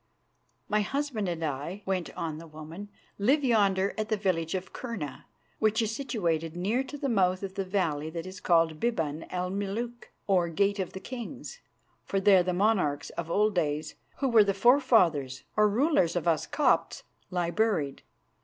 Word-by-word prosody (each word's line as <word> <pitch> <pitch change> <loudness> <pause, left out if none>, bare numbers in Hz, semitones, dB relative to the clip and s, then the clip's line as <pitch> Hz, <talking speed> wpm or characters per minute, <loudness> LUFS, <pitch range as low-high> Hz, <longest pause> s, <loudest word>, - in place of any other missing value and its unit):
"My 210 0 +2
husband 250 -3 -2
and 165 -1 -3
I," 155 +7 -4
went 185 -3 -2
on 155 -2 -3
the 165 - -10
woman, 160 +6 -9 0.3
"live 270 +9 +3
yonder 200 -5 +3
at 215 - -2
the 215 - +1
village 180 -4 0
of 185 0 -5
Kurna, 210 - -6 0.3
which 220 0 +2
is 225 -1 0
situated 170 - -2
near 215 +9 0
to 290 +2 -7
the 280 - -2
mouth 185 -5 +2
of 190 -1 -4
the 195 0 -2
valley 170 -6 -1
that 165 +1 -5
is 185 0 -8
called 165 -3 +2
Biban 165 -10 -1
el 180 0 -2
Meluk, 215 +5 -4
or 180 -4 +2
Gate 200 +4 +1
of 185 - -3
the 190 - -6
Kings, 245 - -7 0.4
for 195 - -1
there 195 -1 +6
the 180 +1 -1
monarchs 180 -6 +1
of 170 -1 -5
old 210 +4 +2
days, 155 -4 -1 0.2
who 275 - 0
were 230 -4 +6
the 200 -1 0
forefathers 195 - +3
or 210 -1 +4
rulers 225 - +2
of 175 -1 -1
us 165 -2 +2
Copts, 300 - +1 0.3
lie 175 -2 -1
buried. 185 -10 0
190 Hz, 175 wpm, -28 LUFS, 165-220 Hz, 0.4 s, there